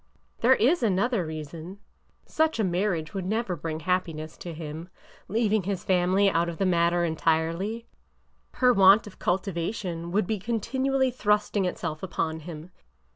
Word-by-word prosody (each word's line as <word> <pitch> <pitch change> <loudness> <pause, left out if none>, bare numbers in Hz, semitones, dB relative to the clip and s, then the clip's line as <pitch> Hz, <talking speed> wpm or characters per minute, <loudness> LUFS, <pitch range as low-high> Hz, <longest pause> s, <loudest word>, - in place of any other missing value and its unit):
'' - - -38
There 255 +3 +6
is 280 +11 +3
another 205 -2 +1
reason. 160 +4 -7 0.5
Such 315 -4 0
a - - +3
marriage 175 -3 -1
would 190 -2 -3
never 215 -2 -1
bring 160 0 -5
happiness 160 -3 -2
to 175 - -7
him, 160 +1 -7 0.2
— - - -23
leaving 220 0 +1
his 190 0 -3
family 185 +2 +3
out 170 -2 +2
of 165 - -6
the 195 - 0
matter 175 -1 +2
entirely. 165 +7 0 0.7
Her 250 -1 +4
want 195 +1 +6
of 205 - -12
cultivation 175 -1 -2
would 205 +2 +1
be 215 +2 -2
continually 260 +5 0
thrusting 210 -3 +1
itself 165 -3 -3
upon 160 -3 -2
him. 160 +1 -9
185 Hz, 155 wpm, -26 LUFS, 165-210 Hz, 0.7 s, There